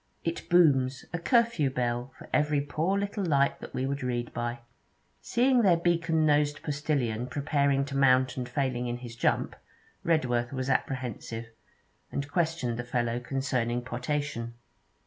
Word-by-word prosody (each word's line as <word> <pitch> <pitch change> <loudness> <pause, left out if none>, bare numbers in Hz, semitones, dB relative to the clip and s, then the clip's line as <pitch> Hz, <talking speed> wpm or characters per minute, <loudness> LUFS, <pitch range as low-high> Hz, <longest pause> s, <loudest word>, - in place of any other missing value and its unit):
It 165 0 -3
booms 135 -7 +4
a 175 - -1
curfew 230 - +3
bell 120 0 -2
for - - -12
every 150 -1 +3
poor 160 +7 0
little 200 0 -2
light 140 -5 +2
that - - -9
we 130 - -1
would 140 +1 -2
read 120 -2 -2
by.' 120 0 -3 0.6
Seeing 250 +1 +3
their 185 -6 +5
beacon 165 -2 +2
nosed 145 -1 +2
postillion 140 -6 -1
preparing 140 0 +1
too 140 -1 -4
mount 130 -1 +4
and 125 -1 -4
failing 125 -2 -1
in 120 0 -2
his 120 -2 -9
jump, - - 0 0.5
Redworth 125 -7 +1
was 130 0 -1
apprehensive, 120 -4 -3 0.6
and 140 0 -3
questioned 160 -9 0
the 120 - -3
fellow 120 0 -1
concerning 125 -2 -1
potation. 125 -1 -3
135 Hz, 145 wpm, -28 LUFS, 120-155 Hz, 0.6 s, their